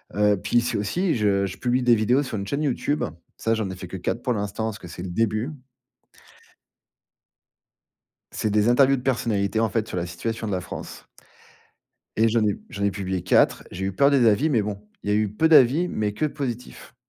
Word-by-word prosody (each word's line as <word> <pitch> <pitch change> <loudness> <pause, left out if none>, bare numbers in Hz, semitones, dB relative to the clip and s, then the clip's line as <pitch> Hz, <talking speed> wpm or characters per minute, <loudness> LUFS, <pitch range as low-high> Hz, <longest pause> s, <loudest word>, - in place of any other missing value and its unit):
Heu, 105 -1 +3
puis 120 - +2
c'est 120 - -1
aussi, 165 - 0
je 100 -3 +2
je 95 0 -6
publie 125 +1 0
des 120 -1 +5
vidéos 120 +6 +2
sur 120 -5 -5
une 100 - -4
chaîne 140 +7 -2
YouTube. 145 +1 -1 0.3
Ça, 115 - 0
j'en 110 -3 -2
ai 95 - -6
fait 90 -1 -8
que 95 - -6
4 115 +6 -3
pour 125 - +1
l'instant, 105 +1 -3
parce 110 -2 -4
que 90 - -10
c'est 90 - -9
le 95 - -5
début 110 - 0 2.8
c'est 110 - -2
des 105 +1 +2
interviews 135 +2 +4
de 125 - -6
personnalités, 110 -5 0
en 115 - +2
fait, 110 +1 -1
sur - - -5
la 85 - -1
situation 110 +6 -4
de 105 - -3
la 90 - -1
France - - -8 1.1
et 115 0 +4
j'en 110 -1 +2
ai 105 - 0
j'en 100 - -5
ai 100 - +2
publié 95 -1 -3
4. 90 - +3
J'ai 95 +2 -4
eu 95 - -1
peur 140 +9 +4
des 135 -4 +4
avis, 110 +9 +3
mais 120 -7 +2
bon, 105 -1 -4 0.3
il 105 - -3
y - - +3
a - - +3
eu 105 -1 +1
peu 135 +11 +2
d'avis 150 +3 +5
mais 105 -7 -2
que 130 - -1
positifs. 125 -4 -6
110 Hz, 220 wpm, -24 LUFS, 100-125 Hz, 2.8 s, des